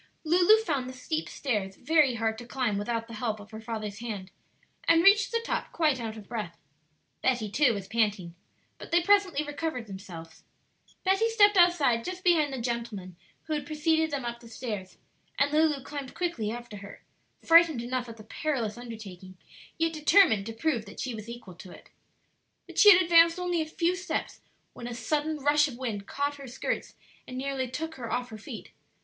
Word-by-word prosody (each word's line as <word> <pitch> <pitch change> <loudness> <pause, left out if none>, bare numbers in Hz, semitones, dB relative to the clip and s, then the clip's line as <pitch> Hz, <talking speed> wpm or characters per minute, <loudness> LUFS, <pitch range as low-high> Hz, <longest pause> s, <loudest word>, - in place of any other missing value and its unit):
Lulu 355 +6 +5
found 275 - -2
the - - -8
steep 310 +5 -3
stairs 205 -8 -2
very 295 -1 +3
hard 225 -1 -1
to 240 - -10
climb 240 -6 -1
without 230 +2 -2
the 230 - -10
help 220 -1 -3
of 205 +2 -13
her 220 0 -8
father's 220 -2 -5
hand, 205 -5 -6 0.6
and 330 0 +5
reached 405 +1 +5
the 465 0 -1
top - - -2
quite 300 -6 +1
out 225 -1 -5
of 210 - -11
breath. 210 -8 -5 0.6
Betty 240 -5 0
too 250 0 +3
was 195 -2 -6
panting. 205 -6 0 0.5
But - - -10
they 340 0 +3
presently 385 -6 +3
recovered 290 -4 -4
themselves. 180 -5 -10 0.6
Betty 390 +4 +2
stepped 415 -2 +5
outside 320 -10 +4
just 365 +4 -6
behind 325 -6 +3
the 265 - -4
gentleman 230 -6 -4 0.3
who 315 - -4
had 295 -2 -3
preceded 320 +1 +1
them 280 -4 -3
up 235 0 -4
the 235 - -14
stairs, 215 -5 -6 0.4
and 285 0 +2
Lulu 305 -3 +2
climbed 280 -2 -7
quickly 340 -12 -2
after 235 -2 -7
her, 200 0 -11 0.4
frightened 330 -7 +6
enough 250 0 -3
at 230 - -10
the 215 - -11
perilous 240 -3 -3
undertaking, 195 -6 -10 0.4
yet 330 0 +1
determined 305 - +4
to 225 - -5
prove 235 -1 -1
that 200 - -12
she 255 - -3
was 220 0 -8
equal 235 -6 -9
to 180 +2 -12
it. - - -15 0.7
But - - -5
she 415 - +10
had 365 -1 +6
advanced 335 0 +6
only 355 -2 0
a 310 - -3
few 340 +3 0
steps 365 0 -4 0.3
when 240 - -8
a 240 - -5
sudden 305 +4 -1
rush 295 +1 +4
of 250 -4 -8
wind 220 -6 -4
caught 285 +1 -2
her 275 -1 -10
skirts 245 - -4 0.3
and 255 - -7
nearly 265 -1 -2
took 320 +5 -4
her 235 -3 -6
off 245 0 -2
her 215 - -8
feet. 210 - -9
255 Hz, 190 wpm, -28 LUFS, 220-320 Hz, 0.7 s, she